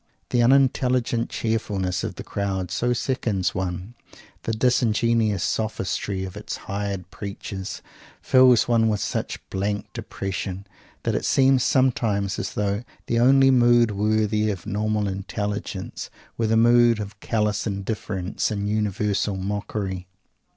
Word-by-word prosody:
The 120 - +3
unintelligent 125 -2 +2
cheerfulness 100 -5 -1
of 110 -5 -4
the - - -7
crowd 95 -3 -3
so 120 +5 0
sickens 115 -7 -1
one; 90 +3 -4 0.5
the - - 0
disingenuous 115 -3 +2
sophistry 100 -2 -2
of 95 - -8
its - - -5
hired 100 -2 -4
preachers 100 -1 -6 0.4
fills 130 -3 +5
one 115 -2 +3
with 105 -1 0
such - - -3
blank 100 +2 -2
depression 95 -4 -5 0.4
that - - 0
it - - -1
seems 135 -1 +4
sometimes 115 -7 +1
as - - -4
though 100 +2 -1 0.2
the 115 - +1
only 135 +2 +6
mood 120 -2 +5
worthy 105 +1 +1
of 95 -5 -4
normal 105 0 0
intelligence 100 0 -4 0.3
were 115 - 0
the 110 +1 +3
mood 120 0 +5
of 100 -1 -7
callous 105 -1 0
indifference 100 -2 -2
and 100 -2 -2
universal 105 -1 0
mockery. 95 -1 -3
105 Hz, 130 wpm, -24 LUFS, 100-115 Hz, 0.5 s, only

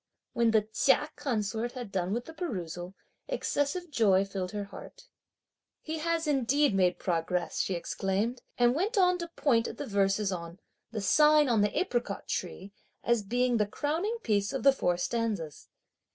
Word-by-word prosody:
When 235 -1 +3
the 220 -2 +3
Chia 270 +7 +2
consort 235 -4 -2
had 245 -6 -7
done 185 -1 -1
with 240 +3 -2
the 320 - -10
perusal, 185 - -5 0.3
excessive 350 - -1
joy 200 -7 +3
filled 190 -2 -4
her 205 -1 -3
heart. - - -12 0.7
"He 320 0 -5
has 335 +1 0
indeed 285 -2 +2
made 185 -2 +2
progress!" 175 0 -1
she 190 - 0
exclaimed, 195 +7 -2 0.2
and 240 0 +4
went 400 - -1
on 360 -1 +4
to 340 - -4
point 255 -8 +1
at 230 - -7
the - - -4
verses 200 0 +1
on 170 0 -6 0.3
"the 220 -2 -4
sign 300 +7 +5
on 230 -4 +3
the 205 - 0
apricot 240 - -2
tree," 190 +2 -4 0.3
as 235 -2 +2
being 245 +4 +1
the 210 -2 +1
crowning 325 - -2
piece 205 -2 +1
of 270 - -3
the 275 0 +7
four 180 -9 0
stanzas. 200 - -3
230 Hz, 165 wpm, -29 LUFS, 195-290 Hz, 0.7 s, the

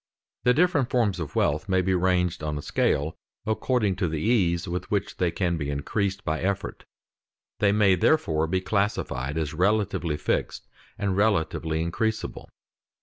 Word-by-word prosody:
The 125 0 +5
different 160 -6 +2
forms 110 -7 +1
of 80 -4 -5
wealth 75 +7 +1
may 95 -1 +2
be 95 +1 +1
ranged 90 -2 +1
on 75 -1 -2
a 75 - -6
scale 75 +3 0 0.3
according 110 -2 0
to 95 -2 0
the 80 -1 -2
ease 90 -4 +1
with 90 +1 -4
which 100 -1 -2
they 90 - +2
can 85 0 -1
be 70 -2 -3
increased 95 +8 -2
by 80 +1 -1
effort. 100 +2 -3 0.7
They 100 -1 +4
may 100 -2 +4
therefore 80 - +2
be 95 +3 0
classed 100 +2 +1
as 75 +5 -3
relatively 95 -3 +1
fixed - - -2 0.3
and 100 -2 -1
relatively 80 -5 +1
increasable. 110 +6 -2
95 Hz, 155 wpm, -26 LUFS, 80-105 Hz, 0.7 s, The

